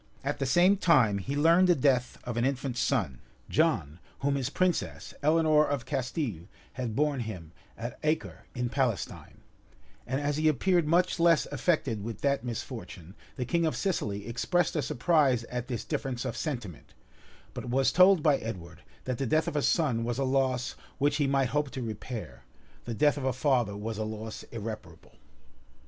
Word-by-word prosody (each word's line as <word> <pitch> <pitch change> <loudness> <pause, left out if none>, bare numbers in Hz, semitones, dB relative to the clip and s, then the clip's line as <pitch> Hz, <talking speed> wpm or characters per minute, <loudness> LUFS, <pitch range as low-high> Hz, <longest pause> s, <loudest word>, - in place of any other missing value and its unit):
At 145 +1 -2
the 135 - 0
same 180 +8 +5
time, 130 - +4
he 135 +9 -4
learned 165 +5 +5
the 175 - +5
death 130 -3 +1
of 120 -2 -4
an 120 - 0
infant 135 -1 -1
son, 95 - 0 0.3
John 75 +4 +1 0.2
whom 140 +1 +1
his 135 -3 -1
princess, 185 -2 -1
Eleanor 155 0 +4
of 140 -4 -2
Castile, 125 - -3 0.3
had 120 -4 -4
born 150 -1 +1
him 95 -9 -6 0.3
at 120 +2 -6
Acre, 155 +1 -2
in 125 0 -1
Palestine; 125 -5 -2 0.7
and 130 +2 -1
as 145 0 -1
he 155 0 +2
appeared 170 +3 +2
much 175 +3 +2
less 165 -1 +4
affected 140 - 0
with 115 0 -6
that 140 -3 +1
misfortune, 110 - -7 0.2
the 125 - -3
king 170 +6 +1
of 160 - +1
Sicily 105 - -2
expressed 170 +10 0
a 155 - +1
surprise 140 -2 +2
at 125 -1 -3
this 120 -4 -4
difference 135 -5 -3
of - - -3
sentiment; 120 - -5 0.6
but - - -6
was 135 +2 +2
told 185 -2 +6
by 150 -4 +4
Edward, 90 -9 -7 0.2
that 130 -2 -3
the 135 - -1
death 155 +6 +2
of - - -3
a 145 - +2
son 135 -8 +1
was 120 0 -2
a 135 - 0
loss 130 -2 0 0.2
which 145 +1 +2
he 145 -3 +2
might 135 -1 +2
hope 150 -1 0
to 130 - -6
repair; 115 +1 -6 0.4
the 120 - -4
death 145 +3 +3
of 140 - -4
a 130 - +1
father 125 -5 +1
was 110 +1 -4
a - - 0
loss 110 0 -6
irreparable. 105 -7 -8
135 Hz, 180 wpm, -29 LUFS, 115-150 Hz, 0.7 s, told